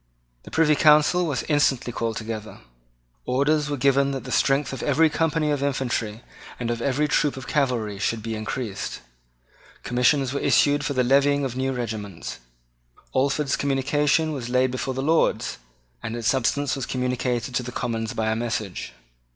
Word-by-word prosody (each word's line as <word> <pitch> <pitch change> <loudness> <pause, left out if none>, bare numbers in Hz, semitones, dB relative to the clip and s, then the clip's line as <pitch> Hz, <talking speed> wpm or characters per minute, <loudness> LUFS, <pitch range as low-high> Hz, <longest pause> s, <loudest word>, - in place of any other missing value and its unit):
The - - -12
Privy 160 -1 +3
Council 155 +4 +4
was 145 -5 -1
instantly 140 -5 +1
called 115 -1 -2
together. 110 -1 -6 0.7
Orders 145 +3 +1
were 145 - -2
given 140 +1 +3
that 135 - -4
the - - -7
strength 135 -1 +2
of 135 - -5
every 160 0 +3
company 160 -1 +1
of 145 -2 -1
infantry 120 -5 -2 0.4
and 120 -1 -2
of 115 0 -3
every 140 +3 +1
troop 145 -1 +1
of 130 - -7
cavalry 120 -8 -1
should 110 +1 -1
be 115 0 -3
increased. 110 0 -4 0.8
Commissions 125 +2 +2
were 140 - -1
issued 145 0 +3
for 145 -1 -1
the 130 -1 +2
levying 140 +2 +3
of 125 -2 -4
new 130 +1 -1
regiments. 110 -7 -5 0.8
Alford's 140 +2 +1
communication 145 +3 +1
was 130 -5 -5
laid 125 0 +2
before 130 +1 -3
the 135 - -2
Lords; 160 - +1 0.4
and 110 - -4
its 115 -2 -3
substance 135 +2 +1
was 135 -3 -4
communicated 125 -1 -1
to 125 - +1
the 125 0 -6
Commons 115 -2 -3
by 110 0 0
a - - 0
message. 110 -5 -3
130 Hz, 165 wpm, -24 LUFS, 120-145 Hz, 0.8 s, Council